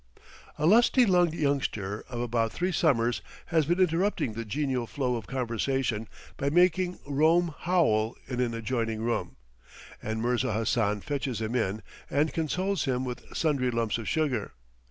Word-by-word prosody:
A 150 - 0
lusty 235 +6 +5
lunged 175 -4 +3
youngster 125 - -1
of 120 -2 -4
about 115 -2 0
three 180 +1 -1
summers 125 -9 +2 0.2
has 160 -4 +1
been 175 +2 +1
interrupting 180 - +1
the 115 +2 -4
genial 130 +1 -2
flow 125 -2 -1
of 115 -3 -6
conversation 125 -2 -1 0.3
by 140 - 0
making 180 +2 +3
"Rome 160 +4 +3
howl" 120 -12 +1
in 125 -2 -4
an 120 -2 0
adjoining 115 -1 -2
room, 120 0 -2 0.7
and 110 +1 -3
Mirza 120 0 0
Hassan 105 -1 0
fetches 135 -4 -3
him 110 +1 -3
in 110 -3 -1 0.3
and 145 +1 +1
consoles 185 +5 -1
him 130 -1 0
with 125 -1 -6
sundry 140 -6 +1
lumps 115 -1 -1
of 115 - -4
sugar. 140 -9 -1
130 Hz, 155 wpm, -28 LUFS, 115-160 Hz, 0.7 s, lusty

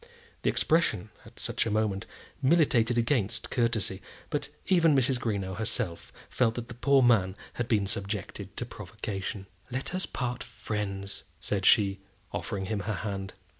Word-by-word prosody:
The - - +2
expression, 110 - +2 0.2
at - - -15
such - - 0
a - - +1
moment, 105 -1 0 0.3
militated 130 -6 +4
against 115 -3 +1
courtesy; 115 -6 +1 0.3
but - - -1 0.2
even 165 -5 +5
Mrs. 130 -1 +3
Greenow 100 -5 -1
herself 95 -5 -2 0.2
felt 115 -3 +2
that 120 -1 -5
the - - -5
poor 135 +2 +4
man 100 -6 +4 0.2
had 120 - -2
been 105 -5 +3
subjected 100 0 -4
to - - -2
provocation. 95 -1 -5 0.2
"Let 130 +7 -3
us 185 +1 -1
part 125 -1 -2
friends," 100 -3 -4 0.2
said 95 +2 0
she, 100 -2 +5 0.3
offering 100 -3 -2
him 105 +1 -1
her 105 +1 -2
hand. 95 -2 -4
110 Hz, 150 wpm, -29 LUFS, 100-125 Hz, 0.3 s, even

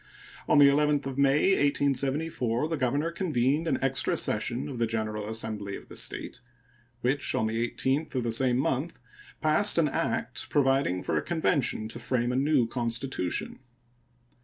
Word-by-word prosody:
On - - +4
the 145 - +8
11th 145 0 +2
of 135 0 -4
May, 140 +5 +3
1874, 140 -3 0
the 165 - -1
governor 145 +4 0
convened 155 -3 0
an - - +1
extra 135 -1 +1
session 120 +6 -1
of 130 -5 -6
the 115 - +1
general 110 -1 -3
assembly 110 -3 -3
of - - -12
the - - -11
State, - - -3 0.6
which 135 +3 0
on 110 - +1
the 115 +2 -1
18th 140 +3 -1
of 125 - 0
the 115 - -1
same 125 +1 +2
month 135 +5 -1 0.4
passed 165 +7 +4
an 165 -2 +4
act - - -2
providing 135 -10 +1
for - - -1
a - - +1
convention 160 -9 0
to 115 - -9
frame 120 0 -1
a - - -2
new 140 -1 +2
constitution. 120 -4 -3
135 Hz, 160 wpm, -28 LUFS, 115-145 Hz, 0.6 s, the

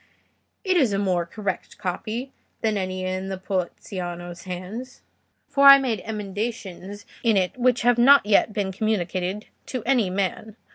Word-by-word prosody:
It 375 -3 +2
is 255 -10 +3
a - - +1
more 180 -4 0
correct 200 0 -5
copy 215 +6 -4 0.3
than 220 -2 +1
any 185 -1 -3
in 185 +1 -3
Poliziano's 175 -2 -5
hands, 190 +8 -7 0.4
for 280 0 +4
I 275 0 +12
made 255 -5 -1
emendations 205 -2 -5 0.2
in 225 -4 +3
it 185 -1 0
which 250 -1 +2
have 240 0 +4
not 275 +2 +7
yet 210 +1 +3
been 205 -2 -2
communicated 190 -1 -2 0.2
to 255 -4 -4
any 235 -6 +2
man. 200 +3 -3
205 Hz, 145 wpm, -24 LUFS, 185-235 Hz, 0.4 s, I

